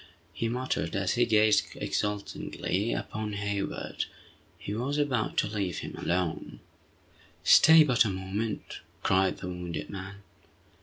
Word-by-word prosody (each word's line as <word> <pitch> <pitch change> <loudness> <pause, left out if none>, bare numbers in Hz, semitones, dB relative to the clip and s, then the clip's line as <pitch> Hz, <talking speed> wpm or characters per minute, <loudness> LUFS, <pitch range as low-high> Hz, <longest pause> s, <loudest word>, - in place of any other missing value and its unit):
he 115 - -2
muttered, 120 -9 -2
as 100 -1 0
he 120 -1 +2
gazed 110 -1 +4
exultingly 105 0 -2
upon 105 -1 -3
Hayward. 100 0 -3 0.5
He 100 - -5
was 130 +7 -2
about 135 -7 0
to - - +3
leave 100 -5 -2
him - - -7
alone. 90 -2 -2 0.8
"Stay 160 0 +8
but 125 -5 +4
a 110 - -1
moment!" 95 +4 -4 0.2
cried 95 0 +2
the - - -6
wounded 85 -4 -5
man. 100 +1 -8
100 Hz, 130 wpm, -29 LUFS, 95-115 Hz, 0.8 s, Stay